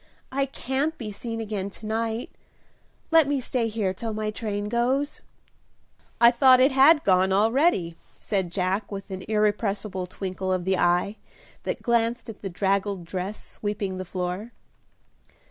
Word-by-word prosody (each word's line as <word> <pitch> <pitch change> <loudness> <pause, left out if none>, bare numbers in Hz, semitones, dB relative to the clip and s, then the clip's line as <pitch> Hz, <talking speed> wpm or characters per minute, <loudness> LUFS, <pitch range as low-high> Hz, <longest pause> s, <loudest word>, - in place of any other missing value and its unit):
"I 275 +1 0
can't 270 +4 -2
be 215 -4 -5
seen 225 +2 -5
again 205 -3 -3
to 215 - -10
night; 225 +2 -2 0.8
let 325 -3 +6
me 285 -1 +1
stay 245 -2 -1
here 210 -4 -1
till 225 +3 -4
my 215 0 -2
train 210 -2 -3
goes." 255 +6 0 1.0
"I 235 0 +8
thought 255 +1 +6
it 265 +3 +5
had 285 +4 +6
gone, 190 0 +3
already," 215 - +2 0.2
said 190 -4 -2
Jack, 190 +3 -1
with 195 0 -7
an 190 0 -5
irrepressible 210 -3 0
twinkle 185 0 -4
of 185 -1 0
the 190 0 +2
eye 180 +4 +2 0.5
that - - -3
glanced 235 0 +1
at 210 - -16
the 195 - -4
draggled 195 0 0
dress 185 +4 -5
sweeping 205 -3 -4
the - - -3
floor. 180 +5 -4
210 Hz, 150 wpm, -25 LUFS, 190-235 Hz, 1.0 s, I